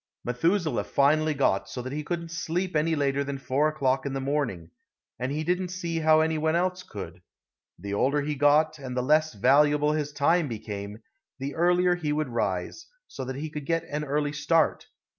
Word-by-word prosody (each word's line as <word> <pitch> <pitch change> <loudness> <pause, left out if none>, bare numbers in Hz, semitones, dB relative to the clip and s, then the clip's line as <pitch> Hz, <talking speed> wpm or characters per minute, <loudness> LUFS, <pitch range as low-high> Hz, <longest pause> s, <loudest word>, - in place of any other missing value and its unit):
Methuselah 165 +8 +1
finally 155 +2 +2
got 140 - +1
so 125 - -5
that 130 +2 -5
he 150 - -2
couldn't 170 +1 -4
sleep 170 +2 -2
any 160 +2 +2
later 140 -1 0
than 140 0 -4
4 135 +2 +1
o'clock 135 -4 0
in 140 - -3
the 135 - -2
morning, 130 - -2 0.5
and 125 +2 -2
he 155 +2 -2
didn't 180 +3 0
see 170 -2 -3
how 155 0 +5
any 160 0 0
one 160 +1 +1
else 180 +1 0
could. 95 - -9 0.6
The 100 +3 -6
older 140 +7 +1
he 150 +1 -2
got, 150 +2 +3
and 130 -2 -6
the 125 - +1
less 155 0 +2
valuable 145 +6 +4
his 150 -1 -2
time 155 +3 +2
became, 105 -2 -6 0.3
the 135 +1 -4
earlier 180 +1 +3
he 160 -4 -2
would 150 -2 -1
rise, 100 - -2 0.2
so - - -7
that 130 +1 -5
he 150 +3 -5
could 150 -2 -6
get 165 -1 +1
an 150 +1 -2
early 145 0 -1
start. 150 +3 +1
150 Hz, 195 wpm, -27 LUFS, 135-160 Hz, 0.6 s, how